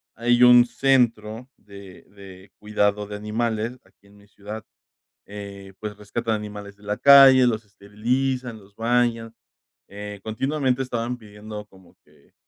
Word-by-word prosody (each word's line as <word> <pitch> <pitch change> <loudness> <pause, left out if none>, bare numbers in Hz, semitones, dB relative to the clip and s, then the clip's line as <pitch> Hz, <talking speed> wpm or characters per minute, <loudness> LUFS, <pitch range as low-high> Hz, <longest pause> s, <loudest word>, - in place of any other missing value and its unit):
hay 120 +1 +2
un 120 0 +8
centro 120 -2 0
de 100 -2 -14
de 95 -1 -14
cuidado 105 -1 0
de 105 - -7
animales, 110 +3 -3
aquí 100 - -29
en 100 0 -21
mi 100 0 -21
ciudad, 105 +2 -9 0.7
eh, 100 -1 -9
pues, 105 -1 -6
rescatan 110 +2 -3
animales 105 -1 -7
de 100 - -25
la 105 0 -3
calle, 135 -2 +8
los 115 -2 -1
esterilizan, 120 +4 -3
los 100 0 -20
bañan, 115 -1 0 0.6
eh, 105 0 -8
continuamente 135 +3 -1
estaban 120 0 -3
pidiendo, 105 -1 -10
como 95 -3 -21
que - - -27
110 Hz, 140 wpm, -23 LUFS, 105-120 Hz, 0.7 s, un